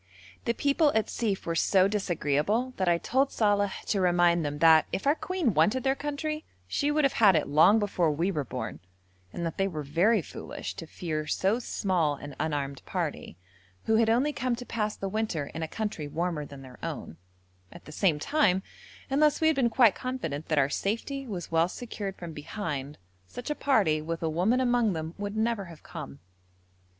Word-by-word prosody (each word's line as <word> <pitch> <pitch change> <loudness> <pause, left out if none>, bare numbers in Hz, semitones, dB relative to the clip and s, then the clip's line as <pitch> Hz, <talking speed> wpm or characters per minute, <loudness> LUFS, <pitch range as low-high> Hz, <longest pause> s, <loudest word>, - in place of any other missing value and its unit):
The 235 - +1
people 285 +3 +3
at 220 - +1
Sief 210 -5 -2
were 165 - -1
so 185 +3 +4
disagreeable 200 - 0
that 185 -2 +1
I 170 - +4
told 265 +9 +1
Saleh 205 -2 +2
to 200 - 0
remind 175 -1 +3
them 145 0 -3
that, 160 0 +6
if - - -3
our 285 - +5
Queen 325 - -1
wanted 250 +7 +3
their 265 - +3
country, 295 +2 -3 0.2
she 285 - 0
would 300 +1 +2
have 275 - +3
had 200 -4 +7
it 155 - +1
long 160 +9 +6
before 195 -6 +1
we 170 +6 0
were 150 -6 -1
born, 125 -3 -5 0.5
and 170 - -4
that 165 - -4
they 195 - +3
were 155 -5 -4
very 175 +8 +2
foolish - - -7
to 165 - -7
fear 155 -2 -4
so 195 +9 +1
small 180 -10 0
an 145 0 -9
unarmed 140 -3 -2
party, - - -4 0.5
who 220 - +2
had 225 0 +3
only 260 +6 +2
come 255 -3 -1
to 245 +1 -8
pass 215 -3 -2
the 195 - -4
winter 195 -7 -2
in 160 - -5
a 160 - -2
country 205 -5 -4
warmer 160 -1 -2
than 140 -1 -11
their 130 -1 -13
own; 80 - -5 0.5
at - - -13
the - - -10
same 165 -1 +2
time, 190 - +2 0.4
unless 295 +2 +3
we 320 - +1
had 315 -1 +4
been 255 -3 +2
quite 230 -2 +5
confident 165 - -4
that 155 - 0
our 135 -2 +4
safety 230 - -3
was 180 -7 -6
well 165 +1 +3
secured 205 -3 -6
from 170 -2 -8
behind, 150 -3 -5 0.3
such 245 - -6
a - - +2
party, 200 - +2
with 165 +2 -4
a 160 - +1
woman 190 +10 +2
among 240 -4 +2
them, 160 0 -4
would 205 +1 -4
never 220 -2 0
have 165 -3 -13
come. 70 +1 -8
195 Hz, 200 wpm, -28 LUFS, 160-235 Hz, 0.5 s, had